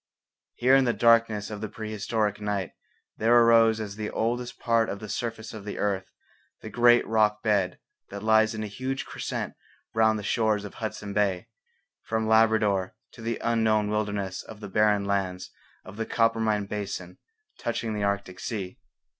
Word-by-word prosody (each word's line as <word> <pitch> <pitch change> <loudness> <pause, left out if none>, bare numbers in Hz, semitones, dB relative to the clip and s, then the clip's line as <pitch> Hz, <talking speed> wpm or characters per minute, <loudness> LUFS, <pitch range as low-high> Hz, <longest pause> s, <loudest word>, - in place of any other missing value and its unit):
Here 130 +2 +4
in 135 -1 +4
the 120 - +2
darkness 115 -3 +3
of 105 -1 -6
the 110 - -4
prehistoric 110 -1 -2
night 100 -3 -2 0.5
there 115 +2 +4
arose 115 -1 +5
as 105 -2 -5
the 105 -1 -3
oldest 120 +2 -2
part 115 -2 +1
of 100 - -3
the 105 - -8
surface 115 0 -4
of 110 -2 -8
the 100 - -6
earth 95 -2 -1 0.5
the - - -8
great 120 0 +5
rock 105 -1 +2
bed 100 -5 +1 0.3
that 100 0 -7
lies 110 0 +4
in 110 - -3
a - - -3
huge 130 +6 -4
crescent - - -4 0.4
round 110 -1 +3
the 105 - -6
shores 110 -1 +1
of 100 - -8
Hudson 105 -2 -5
Bay, 100 0 0 0.5
from 110 0 -2
Labrador 110 -4 +3 0.2
to - - -13
the 115 +1 -2
unknown 110 -2 +2
wilderness 105 -3 -2
of 110 -2 -12
the 105 -2 -8
barren 105 0 +2
lands 95 -2 -2 0.3
of 100 - -11
the 115 - -3
Coppermine 110 -2 +1
basin 100 -3 -5 0.4
touching 115 -1 -2
the 105 - -3
Arctic 100 -2 -2
sea. 95 -6 -5
110 Hz, 170 wpm, -27 LUFS, 100-115 Hz, 0.5 s, arose